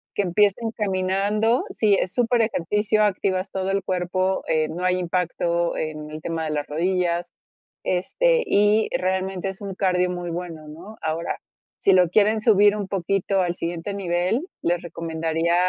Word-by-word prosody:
que -, -, +2 dB
empiecen 205 Hz, +4 st, +2 dB
caminando, 205 Hz, +3 st, +1 dB
sí 210 Hz, -2 st, +2 dB
es 185 Hz, -, -2 dB
super 245 Hz, -1 st, +2 dB
ejercicio, 215 Hz, +1 st, +1 dB
activas 190 Hz, -1 st, 0 dB
todo 190 Hz, 0 st, -2 dB
el 195 Hz, 0 st, 0 dB
cuerpo, 185 Hz, +1 st, -1 dB
eh, 155 Hz, -1 st, +1 dB
no 175 Hz, +3 st, -5 dB
hay 180 Hz, 0 st, +2 dB
impacto 170 Hz, -1 st, 0 dB
en 155 Hz, -1 st, -4 dB
el 155 Hz, 0 st, -7 dB
tema 165 Hz, -1 st, -3 dB
de 155 Hz, -, -2 dB
las 150 Hz, -1 st, -2 dB
rodillas. 175 Hz, +2 st, -1 dB, 0.5 s
Este, 485 Hz, -, +1 dB
y 210 Hz, +2 st, +3 dB
realmente 190 Hz, +1 st, -1 dB
es 190 Hz, +1 st, -9 dB
un 200 Hz, -1 st, -5 dB
cardio 180 Hz, -1 st, +1 dB
muy 175 Hz, -1 st, -4 dB
bueno, 165 Hz, -3 st, -6 dB
¿no? 175 Hz, +8 st, -11 dB
Ahora, 160 Hz, +1 st, -2 dB, 0.4 s
si 195 Hz, -, +3 dB
lo 180 Hz, -2 st, +5 dB
quieren 215 Hz, +3 st, +3 dB
subir 210 Hz, -2 st, +5 dB
un 205 Hz, -2 st, -3 dB
poquito 195 Hz, +1 st, 0 dB
al 175 Hz, -1 st, -1 dB
siguiente 170 Hz, +3 st, -4 dB
nivel, 185 Hz, -, 0 dB, 0.2 s
les 175 Hz, 0 st, 0 dB
recomendaría, 165 Hz, 0 st, -1 dB
185 Hz, 160 wpm, -23 LUFS, 170-205 Hz, 0.5 s, lo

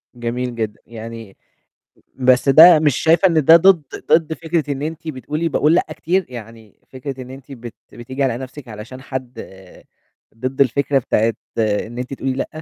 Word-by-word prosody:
جميل 120 Hz, +1 st, -4 dB
جدًا، 110 Hz, -2 st, -4 dB
يعني 115 Hz, -2 st, -10 dB, 0.8 s
بس 130 Hz, +1 st, +2 dB
ده 160 Hz, +4 st, +9 dB
مش 150 Hz, -4 st, +2 dB
شايفة 170 Hz, +4 st, +4 dB
إن 160 Hz, -4 st, +1 dB
ده 165 Hz, -, +9 dB
ضد، 175 Hz, -1 st, +5 dB, 0.3 s
ضد 160 Hz, 0 st, +3 dB
فكرة 160 Hz, -2 st, -2 dB
أنتِ 160 Hz, 0 st, -7 dB
بتقُولِي 150 Hz, +3 st, -3 dB
باقُول 155 Hz, +1 st, +2 dB
لأ 175 Hz, -, +3 dB
كتير، 180 Hz, +2 st, 0 dB
يعني 115 Hz, -3 st, -12 dB
فكرة 130 Hz, 0 st, -7 dB
إن 125 Hz, -, -11 dB
أنتِ 135 Hz, +1 st, -12 dB
بت 120 Hz, -3 st, -9 dB, 0.2 s
بتيجي 130 Hz, +4 st, -5 dB
على 125 Hz, -3 st, 0 dB
نَفْسِك 130 Hz, 0 st, -10 dB
علشان 115 Hz, +4 st, -10 dB
حَد، 130 Hz, -3 st, -7 dB, 1.0 s
ضِد 130 Hz, +4 st, -4 dB
الفكرة 140 Hz, +2 st, +2 dB
بتاعة 115 Hz, -2 st, +1 dB, 0.3 s
إن 110 Hz, +2 st, -1 dB
أنتِ 125 Hz, +2 st, -5 dB
تقولِي 135 Hz, 0 st, -3 dB
لأ؟ 130 Hz, -, -3 dB
130 Hz, 160 wpm, -19 LUFS, 120-155 Hz, 1.0 s, ده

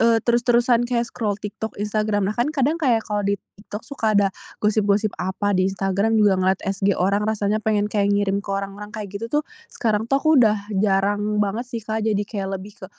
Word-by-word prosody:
eee, 230 Hz, 0 st, +5 dB
terus-terusan 240 Hz, 0 st, +3 dB
kayak 240 Hz, -1 st, +1 dB
scroll 210 Hz, -4 st, -3 dB
TikTok, 215 Hz, +1 st, -6 dB
Instagram. 210 Hz, -1 st, 0 dB
Bahkan 240 Hz, +6 st, 0 dB
kadang 305 Hz, +2 st, 0 dB
kayak 235 Hz, -6 st, +2 dB
kalau 210 Hz, -1 st, -1 dB
di 200 Hz, -, +2 dB, 0.2 s
TikTok 210 Hz, +2 st, -8 dB
suka 220 Hz, -6 st, 0 dB
ada 195 Hz, -1 st, +3 dB, 0.3 s
gosip-gosip 210 Hz, 0 st, +2 dB
apa, 190 Hz, +2 st, -1 dB
di 185 Hz, 0 st, +2 dB
Instagram 195 Hz, +3 st, 0 dB
juga 200 Hz, -3 st, +4 dB
ngeliat 190 Hz, +1 st, +1 dB
SG 195 Hz, 0 st, 0 dB
orang 200 Hz, +3 st, +1 dB
rasanya 215 Hz, 0 st, 0 dB
pengen 210 Hz, -1 st, 0 dB
kayak 200 Hz, -1 st, +2 dB
ngirim 200 Hz, -1 st, +1 dB
ke 200 Hz, -, -15 dB
orang-orang 200 Hz, +1 st, -6 dB
kayak 205 Hz, -1 st, -7 dB
gitu, 230 Hz, -, -4 dB
tuh. 295 Hz, +3 st, +1 dB, 0.3 s
Sekarang 220 Hz, -1 st, -1 dB
tuh, 275 Hz, -, +3 dB
aku 310 Hz, -4 st, +6 dB
udah 215 Hz, -2 st, +4 dB, 0.2 s
jarang 200 Hz, 0 st, +2 dB, 0.2 s
banget 230 Hz, +5 st, -3 dB
sih, 230 Hz, -3 st, -6 dB
Kak, 220 Hz, 0 st, -2 dB
jadi 210 Hz, -2 st, 0 dB
kayak 195 Hz, -2 st, -4 dB
lebih 200 Hz, +3 st, -10 dB
ke, -, -, -8 dB
210 Hz, 200 wpm, -22 LUFS, 200-225 Hz, 0.3 s, aku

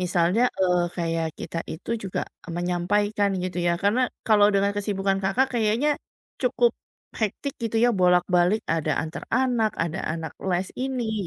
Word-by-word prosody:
Misalnya, 180 Hz, +5 st, +2 dB, 0.2 s
eee, 180 Hz, -1 st, +3 dB
kayak 165 Hz, -1 st, -1 dB
kita 165 Hz, -, -5 dB
itu 160 Hz, -, -8 dB
juga 190 Hz, -, -2 dB, 0.4 s
menyampaikan 200 Hz, +4 st, +1 dB
gitu 185 Hz, -1 st, -3 dB
ya, 170 Hz, -, +3 dB
karena 205 Hz, +5 st, +3 dB, 0.3 s
kalau 210 Hz, -2 st, +6 dB
dengan 200 Hz, +1 st, +3 dB
kesibukan 195 Hz, -1 st, 0 dB
Kakak 245 Hz, +8 st, +2 dB
kayaknya, 235 Hz, +7 st, +2 dB, 0.4 s
cukup, 480 Hz, -1 st, +2 dB, 0.4 s
hectic 230 Hz, +6 st, -3 dB
gitu 230 Hz, -1 st, -3 dB
ya 245 Hz, -, +5 dB
bolak-balik 180 Hz, +1 st, +3 dB
ada 155 Hz, -2 st, +1 dB
antar 160 Hz, +1 st, -7 dB
anak, 245 Hz, -4 st, +2 dB
ada 170 Hz, +2 st, -3 dB
anak 165 Hz, -1 st, -4 dB, 0.2 s
les 185 Hz, +1 st, 0 dB
ini 235 Hz, -7 st, -2 dB
195 Hz, 145 wpm, -25 LUFS, 175-220 Hz, 0.4 s, kalau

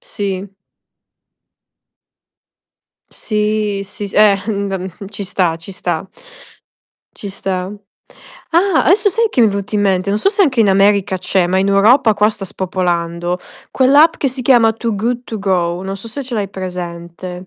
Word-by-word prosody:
Sì. 200 Hz, -, -5 dB, 2.6 s
Sì, 210 Hz, -2 st, -1 dB
sì, 205 Hz, +1 st, -7 dB
s -, -, -13 dB
eh, 210 Hz, -1 st, +5 dB
mhmm, 200 Hz, -2 st, -2 dB
ehm, 190 Hz, 0 st, -4 dB, 0.2 s
ci 205 Hz, -1 st, -6 dB
sta, 180 Hz, -3 st, 0 dB
ci 165 Hz, +4 st, -11 dB
sta 175 Hz, -1 st, -3 dB, 1.1 s
ci 205 Hz, -, -7 dB
sta. 190 Hz, -1 st, -4 dB, 0.8 s
Ah! 355 Hz, +1 st, +3 dB
Adesso 400 Hz, +4 st, +4 dB
sai 460 Hz, +4 st, +1 dB
che 255 Hz, -, +1 dB
mi 230 Hz, -, +6 dB
è -, -, -1 dB
venuto 200 Hz, +1 st, -4 dB
in 205 Hz, -, +2 dB
mente? 190 Hz, -1 st, +1 dB
Non 205 Hz, -, +1 dB
so 230 Hz, -, +2 dB
se 405 Hz, -1 st, +2 dB
anche 260 Hz, -8 st, +2 dB
in 210 Hz, -, +4 dB
America 195 Hz, 0 st, +3 dB
c'è, 185 Hz, 0 st, +1 dB
ma 185 Hz, +2 st, +1 dB
in 195 Hz, +1 st, +1 dB
Europa 220 Hz, +4 st, +4 dB
qua 210 Hz, +1 st, +3 dB
sta 210 Hz, -2 st, -6 dB
spopolando. 175 Hz, -2 st, -2 dB, 0.3 s
Quell'app 285 Hz, +5 st, +4 dB
che 275 Hz, -, 0 dB
si 255 Hz, 0 st, -6 dB
chiama 235 Hz, -3 st, +4 dB
To 225 Hz, 0 st, -3 dB
Good 240 Hz, +4 st, -2 dB
To 220 Hz, -, -6 dB
Go, 180 Hz, -2 st, -1 dB
non 195 Hz, +1 st, -4 dB
so 195 Hz, +4 st, -9 dB
se 280 Hz, +5 st, -5 dB
ce 255 Hz, -2 st, -6 dB
l'hai 205 Hz, -3 st, -2 dB
presente. 180 Hz, -1 st, -7 dB
200 Hz, 170 wpm, -16 LUFS, 185-225 Hz, 2.6 s, mi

